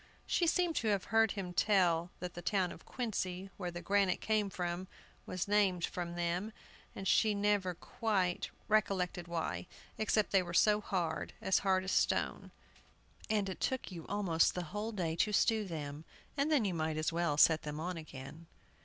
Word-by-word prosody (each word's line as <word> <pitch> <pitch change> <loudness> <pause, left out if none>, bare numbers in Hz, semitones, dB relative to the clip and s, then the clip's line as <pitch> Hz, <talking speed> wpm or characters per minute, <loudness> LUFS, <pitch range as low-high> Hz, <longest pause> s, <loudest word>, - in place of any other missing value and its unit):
She 345 - +1
seemed 345 -1 +2
to 225 - 0
have 200 -3 +2
heard 225 -1 +4
him 185 -4 -5
tell 175 -3 +3
that 180 -1 -4
the 175 - -7
town 185 -1 +1
of - - -12
Quincy, 195 -6 -3
where 180 -3 -3
the 175 0 -7
granite 195 0 +2
came 215 -2 +1
from, 180 0 -3 0.4
was 185 0 -3
named 195 -4 +3
from 175 -1 -5
them, 175 +5 -2 0.4
and 195 - -4
she 215 +2 +4
never 200 -3 +1
quite 190 -1 -1 0.2
recollected 185 -5 +1
why, 160 - -3 0.3
except 215 -1 +1
they 195 - +5
were 175 -1 -5
so 210 +3 +5
hard, 175 -6 -2
as 190 - +2
hard 190 -1 +2
as 190 - -3
stone, - - +1 0.8
and 210 -2 +1
it 190 - -5
took 260 -6 -1
you 170 -3 -8
almost 190 -6 +2
the 180 - -2
whole 210 +2 -2
day 170 -6 -2
to 210 - +2
stew 215 +1 +3
them, 150 -4 -5 0.3
and 290 +2 +1
then 275 -8 +3
you 190 - 0
might 155 -1 -1
as 155 +1 0
well 170 -3 0
set 160 +1 +6
them 150 0 -5
on 180 +3 -3
again. 155 +1 -9
185 Hz, 180 wpm, -34 LUFS, 170-210 Hz, 0.8 s, set